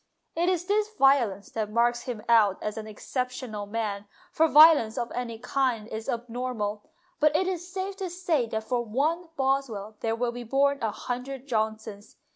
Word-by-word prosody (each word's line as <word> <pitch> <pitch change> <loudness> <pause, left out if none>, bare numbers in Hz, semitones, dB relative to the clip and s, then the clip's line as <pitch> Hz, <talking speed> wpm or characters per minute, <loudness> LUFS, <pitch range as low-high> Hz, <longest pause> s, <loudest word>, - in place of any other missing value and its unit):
It 345 +2 +2
is 355 -2 0
this 420 +2 +1
violence 240 -8 +3
that 215 -2 -2
marks 240 +2 +1
him 235 -5 -5
out 215 -5 +5
as 210 0 -3
an 220 -1 -6
exceptional 245 -1 -4
man, 210 -2 -3 0.2
for 320 +1 +3
violence 300 -8 +7
of 235 -1 -2
any 235 -2 -4
kind 245 -2 -1
is 220 0 -6
abnormal, 235 -3 -3 0.4
but 300 0 +3
it 370 +3 +2
is 360 -1 -4
safe 385 +1 -4
to 380 -2 -4
say 335 -8 0
that 220 0 -3
for 245 +2 -1
one 310 +10 -1
Boswell 260 -6 -1
there 225 0 -1
will 240 +1 -1
be 245 0 -7
born 275 +3 +1
a 225 - +1
hundred 250 +4 -5
Johnsons. 220 -3 -3
245 Hz, 175 wpm, -27 LUFS, 220-280 Hz, 0.4 s, violence